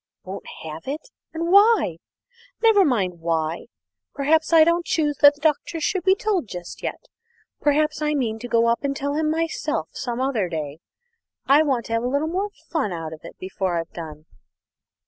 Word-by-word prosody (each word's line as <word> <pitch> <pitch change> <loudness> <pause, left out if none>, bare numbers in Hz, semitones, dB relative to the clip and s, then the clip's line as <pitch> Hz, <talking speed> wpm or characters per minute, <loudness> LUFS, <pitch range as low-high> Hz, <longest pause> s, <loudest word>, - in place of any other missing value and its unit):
"Won't 190 +2 -8 0.2
have 160 +4 -8
it! 305 - -5 0.2
and 335 +1 -2
why?" 400 - +5 0.7
"Never 440 -3 +6
mind 195 - 0
why. 165 +1 -2 0.5
Perhaps 310 +4 +2
I 325 -1 +8
don't 340 +2 +2
choose 300 -3 0
that 285 0 +7
the 295 - -22
Doctor 315 +2 0
shall 360 +4 0
be 380 +1 +4
told 395 - -1
just 175 -2 -8
yet; - - -5 0.5
perhaps 305 +1 +1
I 300 0 +1
mean 225 -5 -1
to 245 - -6
go 230 -1 +3
up 235 +3 +1
and 275 0 -1
tell 285 +1 -2
him 305 +1 0
myself 310 - -2
some 240 -1 -4
other 250 -8 0
day. 155 -2 -5 0.7
I 280 +2 +6
want 265 -7 0
to 230 - -4
have 230 - +1
a - - 0
little 285 +4 0
more 380 +5 -1 0.2
fun 295 - 0
out 165 -2 -5
of 160 - -10
it 170 - -12
before 185 -1 -2
I've 165 0 -4
done." 155 -2 -8
275 Hz, 185 wpm, -23 LUFS, -, 0.7 s, I